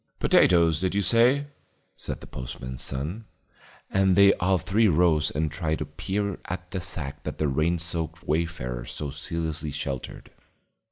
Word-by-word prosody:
"Potatoes, 85 Hz, -3 st, +4 dB
did 95 Hz, 0 st, 0 dB
you 100 Hz, -, +2 dB
say?" 125 Hz, +7 st, +4 dB, 0.5 s
said -, -, -5 dB
the -, -, -10 dB
postman's 65 Hz, 0 st, -7 dB
son. 80 Hz, +12 st, -4 dB, 0.7 s
And 95 Hz, -1 st, +3 dB
they 100 Hz, +1 st, +7 dB
all 95 Hz, +1 st, +3 dB
three 105 Hz, +6 st, +2 dB
rose 80 Hz, -3 st, +3 dB
and 75 Hz, 0 st, -1 dB
tried 80 Hz, 0 st, -1 dB
to 75 Hz, -, -3 dB
peer 95 Hz, +6 st, -3 dB
at 90 Hz, 0 st, -6 dB
the 95 Hz, -, -3 dB
sack 75 Hz, -5 st, -3 dB
that -, -, -5 dB
the 75 Hz, -, +1 dB
rain 80 Hz, +5 st, +1 dB
soaked 85 Hz, 0 st, -4 dB
wayfarer 75 Hz, -7 st, -2 dB
so 70 Hz, +2 st, -5 dB
zealously 80 Hz, 0 st, -3 dB
sheltered. 70 Hz, -2 st, -5 dB
80 Hz, 155 wpm, -26 LUFS, 75-95 Hz, 0.7 s, they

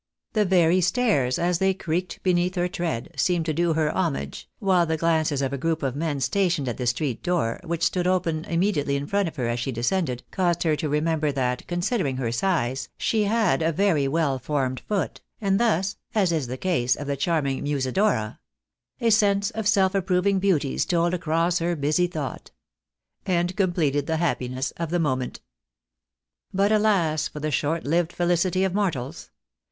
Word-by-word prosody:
The 215 Hz, -2 st, +2 dB
very 180 Hz, -1 st, +4 dB
stairs, 180 Hz, -, +2 dB
as 175 Hz, 0 st, +1 dB
they 190 Hz, 0 st, +2 dB
creaked 180 Hz, 0 st, -3 dB
beneath 180 Hz, 0 st, +1 dB
her 175 Hz, 0 st, +1 dB
tread, 170 Hz, -9 st, -3 dB
seemed 175 Hz, -3 st, +1 dB
to 160 Hz, -, 0 dB
do 170 Hz, +1 st, +1 dB
her 155 Hz, -1 st, 0 dB
homage, 70 Hz, +1 st, -2 dB
while 185 Hz, -3 st, +2 dB
the 160 Hz, 0 st, 0 dB
glances 155 Hz, -3 st, +1 dB
of 135 Hz, 0 st, -1 dB
a 140 Hz, -, -3 dB
group 165 Hz, +1 st, -1 dB
of 135 Hz, -1 st, -1 dB
men 150 Hz, -2 st, -2 dB
stationed 175 Hz, -2 st, +1 dB
at 120 Hz, -, -3 dB
the 125 Hz, -, -2 dB
street 125 Hz, +1 st, -1 dB
door, 170 Hz, -11 st, 0 dB
which 170 Hz, -1 st, -3 dB
stood 180 Hz, +2 st, +1 dB
open 170 Hz, -4 st, 0 dB
immediately 165 Hz, -5 st, 0 dB
in 140 Hz, 0 st, -2 dB
front 200 Hz, +4 st, 0 dB
of 160 Hz, -, -6 dB
her 125 Hz, -5 st, -2 dB
as 120 Hz, +1 st, -1 dB
she 125 Hz, +3 st, -2 dB
descended, 125 Hz, +1 st, -1 dB
caused 175 Hz, -3 st, +1 dB
her 160 Hz, -3 st, +2 dB
to 155 Hz, 0 st, -3 dB
remember 150 Hz, 0 st, +1 dB
that, 125 Hz, -2 st, -2 dB
considering 175 Hz, -, -1 dB
her 120 Hz, -3 st, -1 dB
size, 130 Hz, -3 st, -1 dB
she 215 Hz, -2 st, +1 dB
had 205 Hz, -9 st, +2 dB
a 160 Hz, +1 st, +2 dB
very 165 Hz, -4 st, +2 dB
weU 140 Hz, -3 st, 0 dB
formed 130 Hz, -2 st, -1 dB
foot, 205 Hz, -3 st, -2 dB, 0.2 s
and 195 Hz, -2 st, +1 dB
thus, 200 Hz, -4 st, +1 dB, 0.2 s
as 195 Hz, -5 st, +3 dB
is 155 Hz, -6 st, -1 dB
the 130 Hz, +2 st, -5 dB
case 130 Hz, -8 st, +1 dB
of 145 Hz, -, -6 dB
the 140 Hz, 0 st, -1 dB
charming 140 Hz, -2 st, 0 dB
Musi 140 Hz, -3 st, -1 dB
dora 185 Hz, -, +1 dB, 0.3 s
— -, -, -43 dB
A 230 Hz, -1 st, +3 dB
sense 205 Hz, -1 st, +3 dB
Of 220 Hz, -2 st, -3 dB
self 195 Hz, -3 st, +3 dB
approving 190 Hz, 0 st, +1 dB
beauty 175 Hz, -8 st, +1 dB
stole 170 Hz, -1 st, +1 dB
across 170 Hz, +1 st, +1 dB
Her 170 Hz, +1 st, 0 dB
busy 155 Hz, +4 st, +1 dB
thought 175 Hz, -, -5 dB, 0.4 s
— -, -, -51 dB
and 175 Hz, +2 st, -1 dB
completed 165 Hz, -8 st, +1 dB
the 160 Hz, -1 st, 0 dB
happiness 130 Hz, -5 st, -1 dB
of 170 Hz, -1 st, -3 dB
the 175 Hz, -, 0 dB
moment. 130 Hz, -6 st, -1 dB, 1.1 s
But, 200 Hz, +2 st, +2 dB
alas 190 Hz, -8 st, +2 dB
for 150 Hz, -, -9 dB
the 155 Hz, +1 st, -2 dB
short 155 Hz, +4 st, 0 dB
lived 170 Hz, +3 st, 0 dB
felicity 175 Hz, +2 st, +1 dB
of 190 Hz, -2 st, 0 dB
mortals 170 Hz, -8 st, -2 dB
165 Hz, 190 wpm, -24 LUFS, 140-185 Hz, 1.1 s, very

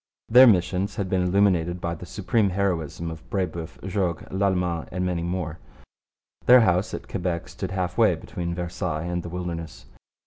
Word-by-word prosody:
Their 125 Hz, +3 st, +9 dB
missions 95 Hz, -1 st, +2 dB
had 100 Hz, -4 st, -3 dB
been 95 Hz, -, +2 dB
illuminated 90 Hz, -2 st, +2 dB
by 85 Hz, -1 st, -2 dB
the 85 Hz, +1 st, -9 dB
supreme 105 Hz, +1 st, +1 dB
heroism 85 Hz, -4 st, -2 dB
of 80 Hz, -1 st, -11 dB
Brebeuf, 85 Hz, -4 st, -3 dB
Jogues, 95 Hz, -3 st, -1 dB
Lalemant, 90 Hz, -4 st, 0 dB
and 90 Hz, +1 st, -2 dB
many 90 Hz, -2 st, -1 dB
more. 85 Hz, -2 st, -3 dB, 0.9 s
Their 125 Hz, 0 st, +9 dB
house 95 Hz, -1 st, +2 dB
at -, -, -8 dB
Quebec 90 Hz, -3 st, -3 dB
stood -, -, -5 dB
half 90 Hz, -2 st, -2 dB
way -, -, +5 dB
between 85 Hz, -1 st, -5 dB
Versailles 85 Hz, -2 st, -3 dB
and 90 Hz, 0 st, -2 dB
the 85 Hz, -, -7 dB
wilderness. 85 Hz, -2 st, -6 dB
90 Hz, 165 wpm, -25 LUFS, 85-95 Hz, 0.9 s, Their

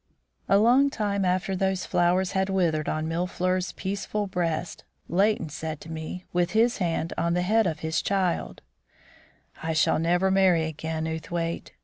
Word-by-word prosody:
A 195 Hz, -, +6 dB
long 245 Hz, +7 st, +5 dB
time 205 Hz, -5 st, -1 dB
after 185 Hz, +1 st, 0 dB
those 190 Hz, -1 st, 0 dB
flowers 180 Hz, +2 st, +2 dB
had 190 Hz, 0 st, 0 dB
withered 170 Hz, -5 st, +1 dB
on 155 Hz, 0 st, -2 dB
Mille 170 Hz, +2 st, -1 dB
fleurs' 185 Hz, 0 st, -1 dB
peaceful 200 Hz, +2 st, -3 dB
breast, 175 Hz, -3 st, -2 dB, 0.2 s
Leighton 195 Hz, -2 st, +1 dB
said 155 Hz, +1 st, -5 dB
to 165 Hz, -, -9 dB
me, 160 Hz, +3 st, -6 dB
with 175 Hz, +1 st, +1 dB
his 230 Hz, +2 st, +3 dB
hand 165 Hz, -2 st, -1 dB
on 170 Hz, +1 st, +1 dB
the 180 Hz, -, +1 dB
head 220 Hz, +2 st, +3 dB
of 160 Hz, -, -3 dB
his 160 Hz, +1 st, 0 dB
child: 190 Hz, -3 st, -1 dB, 1.0 s
"I 160 Hz, 0 st, -1 dB
shall 155 Hz, 0 st, +3 dB
never 175 Hz, +3 st, +2 dB
marry 190 Hz, -4 st, +4 dB
again, 160 Hz, 0 st, -4 dB
Outhwaite. 165 Hz, +1 st, -4 dB
180 Hz, 160 wpm, -26 LUFS, 165-190 Hz, 1.0 s, A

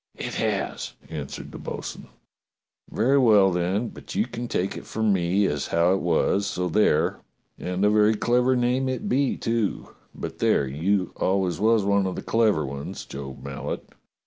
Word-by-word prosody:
"It -, -, -5 dB
has," -, -, -2 dB, 0.2 s
answered 75 Hz, -4 st, -6 dB
the -, -, -9 dB
bo'sun. -, -, -6 dB, 0.8 s
"Very 130 Hz, +6 st, +3 dB
well, 105 Hz, -6 st, +5 dB
then, 95 Hz, +6 st, 0 dB
but -, -, -10 dB
you 105 Hz, -, +2 dB
can 120 Hz, 0 st, -6 dB
take 95 Hz, -4 st, -1 dB
it -, -, -9 dB
from 110 Hz, -2 st, +1 dB
me 95 Hz, +2 st, +2 dB
as 75 Hz, -6 st, -1 dB
how 85 Hz, +2 st, +3 dB
it 95 Hz, -, 0 dB
was, 100 Hz, +1 st, +1 dB
so 90 Hz, -2 st, -2 dB
there, 105 Hz, +3 st, +2 dB, 0.4 s
and 90 Hz, +2 st, -1 dB
a -, -, +5 dB
very 105 Hz, +1 st, +4 dB
clever 125 Hz, +4 st, +2 dB
name 125 Hz, +2 st, +1 dB
it 130 Hz, +11 st, -3 dB
be, 140 Hz, -5 st, +1 dB
too; 115 Hz, -3 st, -1 dB, 0.3 s
but -, -, -6 dB
there, 70 Hz, -, +3 dB
you 90 Hz, +8 st, 0 dB
always 95 Hz, -3 st, 0 dB
was 110 Hz, 0 st, +3 dB
one 100 Hz, -1 st, +2 dB
of 95 Hz, -, -3 dB
the -, -, -5 dB
clever 110 Hz, -9 st, +2 dB
ones. 70 Hz, +1 st, -6 dB
Job 70 Hz, -2 st, -8 dB
Mallet." 70 Hz, +1 st, -5 dB
100 Hz, 170 wpm, -25 LUFS, 90-115 Hz, 0.8 s, well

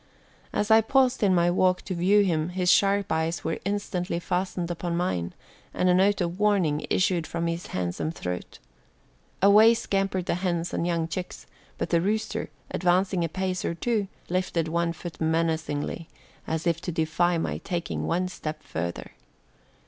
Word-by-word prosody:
As 210 Hz, +1 st, 0 dB
I 220 Hz, 0 st, +8 dB
paused 260 Hz, +2 st, +2 dB
in 195 Hz, -3 st, +4 dB
my 175 Hz, 0 st, +3 dB
walk 185 Hz, 0 st, +2 dB
to 190 Hz, -, -4 dB
view 190 Hz, +4 st, +4 dB
him 165 Hz, -3 st, 0 dB
his 180 Hz, 0 st, +2 dB
sharp 200 Hz, 0 st, +3 dB
eyes 160 Hz, +1 st, -1 dB
were 165 Hz, -, -2 dB
instantly 190 Hz, -4 st, -2 dB
fastened 180 Hz, 0 st, -2 dB
upon 170 Hz, 0 st, -2 dB
mine 90 Hz, -, -2 dB, 0.4 s
and 180 Hz, -, +2 dB
a -, -, +5 dB
note 195 Hz, +2 st, +3 dB
of 175 Hz, +2 st, -2 dB
warning 190 Hz, -8 st, +2 dB
issued 180 Hz, -3 st, +1 dB
from 170 Hz, 0 st, -3 dB
his 170 Hz, +1 st, -3 dB
handsome 90 Hz, -, -2 dB
throat. 90 Hz, -, -5 dB, 0.9 s
Away 215 Hz, +3 st, +7 dB
scampered 195 Hz, -4 st, -1 dB
the -, -, 0 dB
hens 175 Hz, -1 st, -2 dB
and 170 Hz, -, -1 dB
young 165 Hz, -2 st, 0 dB
chicks, 180 Hz, +2 st, -6 dB, 0.3 s
but -, -, -3 dB
the 170 Hz, -1 st, +3 dB
rooster, 215 Hz, +4 st, -1 dB, 0.2 s
advancing 180 Hz, +1 st, +2 dB
a 165 Hz, -, -1 dB
pace 185 Hz, +1 st, -2 dB
or 170 Hz, -, -2 dB
two, 215 Hz, +2 st, 0 dB, 0.2 s
lifted 180 Hz, -2 st, -1 dB
one 170 Hz, +1 st, 0 dB
foot 170 Hz, 0 st, -8 dB
menacingly, 160 Hz, -1 st, -1 dB, 0.4 s
as 160 Hz, +1 st, -2 dB
if 165 Hz, -1 st, +1 dB
to 180 Hz, -, -3 dB
defy 170 Hz, +2 st, +1 dB
my 165 Hz, -, -2 dB
taking 175 Hz, -3 st, -3 dB
one 180 Hz, +2 st, 0 dB
step 155 Hz, -4 st, -6 dB
further. 85 Hz, +2 st, -5 dB
175 Hz, 165 wpm, -26 LUFS, 165-190 Hz, 0.9 s, I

